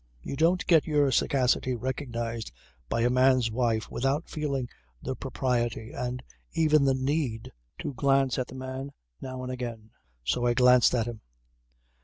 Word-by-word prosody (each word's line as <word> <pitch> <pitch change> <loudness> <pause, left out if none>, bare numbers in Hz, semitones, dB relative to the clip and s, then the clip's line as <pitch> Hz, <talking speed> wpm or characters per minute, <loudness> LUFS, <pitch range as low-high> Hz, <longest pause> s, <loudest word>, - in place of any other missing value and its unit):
You - - -4
don't 170 +5 +2
get 165 -3 +4
your 145 -3 +3
sagacity 130 0 +2
recognized 120 - -4 0.4
by 115 - 0
a 120 - +3
man's 130 -2 +4
wife 115 -2 0
without 135 +6 -1
feeling 140 -5 -2 0.3
the 130 - -4
propriety 120 -4 -2
and 125 +1 -4 0.3
even 155 -3 +4
the 135 -1 +3
need 130 -4 -2 0.3
to - - -4
glance 135 -2 +2
at 125 - -2
the 130 - -11
man 130 +1 -6 0.3
now 130 -1 -6
and 130 - -4
again. 115 -4 -6 0.3
So 120 - 0
I 120 - +2
glanced 125 0 +5
at 115 -3 +1
him. 120 -2 -6
130 Hz, 155 wpm, -28 LUFS, 120-135 Hz, 0.4 s, glanced